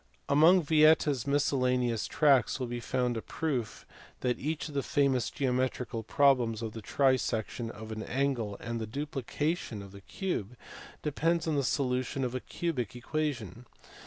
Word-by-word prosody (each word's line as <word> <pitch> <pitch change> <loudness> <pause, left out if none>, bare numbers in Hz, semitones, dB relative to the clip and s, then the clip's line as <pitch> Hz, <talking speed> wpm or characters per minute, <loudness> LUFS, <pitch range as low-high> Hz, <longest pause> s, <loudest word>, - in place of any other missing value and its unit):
Among 165 +5 +6
Vieta 155 0 +5
s 135 -2 -3
miscellaneous 125 -4 +1
tracts 140 -5 +3
will 130 - -1
be 120 0 -4
found 125 0 -1
a - - -3
proof 130 -8 -3 0.4
that 125 -1 0
each 155 +3 -2
of 150 - -9
the 140 - 0
famous 135 -3 +1
geometrical 125 -3 -1
problems 120 -2 +2
of 110 -1 -4
the 110 - -7
trisection 120 -2 0
of 110 0 -9
an 110 0 -4
angle 125 -5 -1
and 115 0 -4
the 110 - -4
duplication 145 - -3
of 100 - -11
the 100 0 -12
cube 125 - -4 0.5
depends 165 +3 0
on 155 - +1
the 140 - +1
solution 130 0 0
of 125 -1 -2
a 130 - -1
cubic 130 -7 -3
equation. 125 - -3
130 Hz, 160 wpm, -30 LUFS, 115-145 Hz, 0.5 s, Among